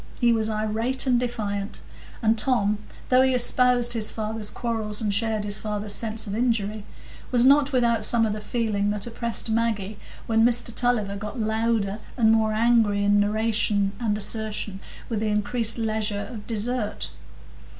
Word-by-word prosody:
He 240 -2 +4
was 220 -1 0
irate 220 +5 -2
and 250 -2 +3
defiant; 215 -4 -4 0.4
and 220 0 +3
Tom, 215 -3 +1 0.3
though 255 0 +5
he 260 -1 +3
espoused 245 0 +3
his 220 -2 +5
father's 215 -1 -3
quarrels 220 -3 -3
and 210 -3 -1
shared 220 0 0
his 205 0 +1
father's 210 -1 -3
sense 220 0 0
of 200 - -5
injury, 215 -3 -1 0.4
was 245 -1 +3
not 280 +1 +5
without 235 -4 +2
some 225 +1 +3
of 215 - -1
the 215 - -6
feeling 210 -2 -1
that 205 -1 -2
oppressed 235 -1 -2
Maggie 220 -3 -1 0.3
when 225 0 +2
Mr 240 0 +1
Tulliver 220 -5 0
got 210 +4 -6
louder 220 -2 -1 0.2
and 220 -3 +4
more 220 -1 +2
angry 220 -2 +2
in 205 0 +3
narration 210 -1 +1
and 215 -3 -1
assertion 210 -2 0 0.3
with 225 -3 -2
the 220 - -1
increased 215 +3 +2
leisure 215 -2 -2
of 215 -4 -9
dessert. 220 - -2
220 Hz, 160 wpm, -24 LUFS, 210-235 Hz, 0.4 s, though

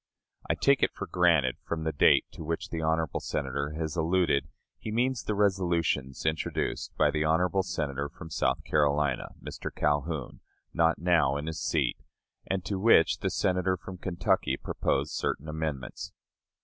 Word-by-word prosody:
I - - +2
take - - +3
it - - +2
for - - -4
granted, 85 -8 +3
from 80 -1 -3
the 80 - 0
date 70 - +5
to - - -9
which 80 +1 -3
the 80 - -2
honorable 80 -1 0
Senator 70 +1 -3
has 80 -1 -3
alluded, 85 -3 +2 0.3
he 110 - -5
means 120 +1 +1
the 105 - -2
resolutions 85 -10 0
introduced 80 0 -1
by - - +4
the 75 0 0
honorable 90 +5 +2
Senator 70 -5 -3
from 80 0 -11
South - - 0
Carolina 75 -2 +1
[Mr. - - -6
Calhoun], 75 -1 -1 0.3
not 85 -1 +3
now 80 -5 +2
in 75 - -4
his 80 0 -4
seat, - - 0 0.5
and 95 -2 -2
to 95 0 -2
which 95 -6 +5
the - - -1
Senator 90 0 +1
from 90 +1 -9
Kentucky 90 -2 0
proposed - - -1
certain 75 - -2
amendments. 75 -5 -4
80 Hz, 160 wpm, -29 LUFS, 75-90 Hz, 0.5 s, date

